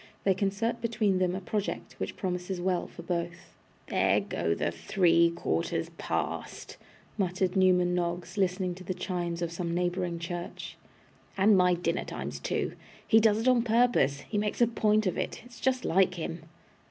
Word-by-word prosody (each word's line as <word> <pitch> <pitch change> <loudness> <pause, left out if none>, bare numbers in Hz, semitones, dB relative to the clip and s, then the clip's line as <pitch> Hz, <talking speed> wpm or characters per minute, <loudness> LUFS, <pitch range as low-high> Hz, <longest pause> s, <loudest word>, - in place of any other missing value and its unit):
They 195 - +4
concert 200 +5 -1
between 215 -5 +1
them 180 -1 +1
a - - -2
Project, 205 +2 -3
which - - -3
promises 180 -1 -3
well 180 0 0
for 170 - -11
both 170 0 -4 0.3
'There - - +2
go 85 - -1
the 85 - -1
three 170 - +3
quarters 85 - -2
past!' - - -3 0.4
muttered 185 0 0
Newman 180 -2 +4
Noggs, 175 +1 -2
listening 185 -2 0
to 185 +1 -11
the 185 +1 -3
chimes 175 -2 -3
of 170 - -2
some 170 0 -3
neighbouring 175 -1 -1
church 175 +1 -6 0.6
'and 200 +2 +5
my 180 -1 +4
dinner 170 0 -1
time's - - -6
two. - - -2 0.3
He 220 - +6
does 215 -1 +4
it 225 +3 -1
on 250 -2 +5
purpose. 230 - +2
He 205 +7 -2
makes 210 0 -2
a 240 - +6
point 215 -2 +2
of 185 - 0
it. - - -4
It's 240 -1 -14
just 260 -1 0
like 185 +1 +3
him. 165 -1 -5
180 Hz, 170 wpm, -29 LUFS, 175-205 Hz, 0.6 s, He